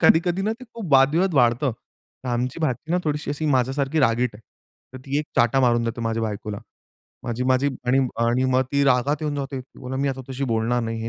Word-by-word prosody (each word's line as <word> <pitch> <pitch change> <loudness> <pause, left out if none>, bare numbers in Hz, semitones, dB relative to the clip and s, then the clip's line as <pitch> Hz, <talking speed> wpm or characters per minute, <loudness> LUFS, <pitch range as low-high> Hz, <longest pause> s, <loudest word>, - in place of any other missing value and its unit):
कधी-कधी 175 +3 +4
ना, 215 +2 0
ते 240 +3 -10
खूप 200 -10 -5
वाद-विवाद 155 +7 +4
वाढतं. 125 0 +3 0.6
आमची 125 +6 -2
भाची 155 +1 -2
ना 180 - +3
थोडीशी 150 -1 -2
अशी 155 +2 -2
माझ्यासारखी 135 +4 0
रागीट 120 -2 +2
आहे. 105 - -13 0.5
तर - - -6
ती 140 +1 0
एक 150 - -3
चाटा 120 +3 +4
मारून 120 -2 +3
देते, 115 +1 -3
माझ्या 115 0 -1
बायकोला. 105 -1 -4 0.7
माझी 120 +1 -2
माझी 130 +2 +2 0.2
आणि 125 +2 +3 0.3
आणि 120 +2 +2
मग 130 - +4
ती 140 0 +3
रागात 135 +2 +3
येऊन 150 -1 -1
जाते, 135 -1 -4 0.2
"बोलते 130 +1 -4
मी 140 - +1
आता 135 -1 -3
तशी 130 +1 -2
बोलणार 115 +2 +1
नाही." 115 0 -3
130 Hz, 200 wpm, -23 LUFS, 120-145 Hz, 0.7 s, कधी-कधी